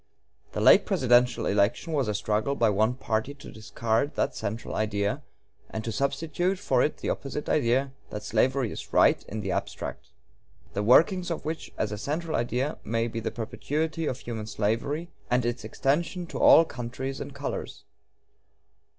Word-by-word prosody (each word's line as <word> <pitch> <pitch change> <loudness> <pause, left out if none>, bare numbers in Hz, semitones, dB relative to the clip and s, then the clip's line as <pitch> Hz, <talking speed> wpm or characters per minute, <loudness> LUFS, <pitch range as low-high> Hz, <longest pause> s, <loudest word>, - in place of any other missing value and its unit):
The - - -2
late - - +7
presidential 125 -1 +3
election 105 +11 +1
was 140 -5 +1
a 105 - -1
struggle 110 +6 0
by 115 -5 +3
one 110 +5 +2
party 115 +2 -2
to 140 - -11
discard 115 +5 -1
that - - 0
central 110 +3 -4
idea 105 +4 -1 0.5
and 110 - -4
to 115 - -3
substitute 155 - 0
for 130 -10 +1
it 150 - +1
the - - -2
opposite 145 +1 -4
idea 135 -1 +2 0.2
that 105 0 -6
slavery 125 +2 +1
is - - -8
right - - +5
in 110 +1 -4
the 100 -2 -2
abstract; - - -4 0.7
the 100 - -1
workings 175 - +4
of 165 - -4
which 160 0 -4
as 105 - -1
a 105 - -4
central 155 +6 -2
idea 125 +5 -1
may 115 +1 0
be 115 0 -4
the - - -2
perpetuity 155 +7 -2
of 125 - -2
human 115 -4 -6
slavery 115 +11 -1 0.2
and 125 0 +2
its 120 +1 -2
extension 170 +6 -1
to - - -6
all 165 - +8
countries 130 0 -5
and - - -7
colors.... - - -5
125 Hz, 170 wpm, -27 LUFS, 110-145 Hz, 0.7 s, all